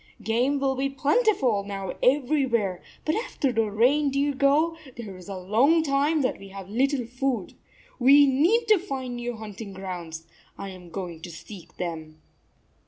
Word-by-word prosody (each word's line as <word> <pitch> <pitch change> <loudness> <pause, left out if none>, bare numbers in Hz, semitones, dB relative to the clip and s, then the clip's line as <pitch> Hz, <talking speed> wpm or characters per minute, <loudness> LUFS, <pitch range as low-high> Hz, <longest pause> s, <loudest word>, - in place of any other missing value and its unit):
"Game 250 +6 +1
will 270 -1 +1
be 270 +1 -1
plentiful 275 - +2
now 195 -1 -5
everywhere, 250 -8 +1 0.2
but 310 - +1
after 320 - -1
the 225 -2 +1
reindeer 280 +6 +2
go, 285 +5 +2 0.2
there 215 -5 -7
is 185 +2 -12
a 195 - -5
long 240 - +3
time 290 +1 +1
that 255 - -1
we 195 - -11
have 195 -1 -9
little 260 +4 0
food. 245 -4 -2 0.5
We 280 +3 +7
need 330 - +3
to 425 -3 +6
find 265 -8 -5
new 240 0 -4
hunting 210 -1 -8
grounds. 175 -4 -7 0.3
I 195 - -6
am 180 -2 -11
going 175 -2 -6
to 175 - -8
seek 175 +2 -12
them." 160 -3 -5
245 Hz, 160 wpm, -26 LUFS, 195-280 Hz, 0.5 s, We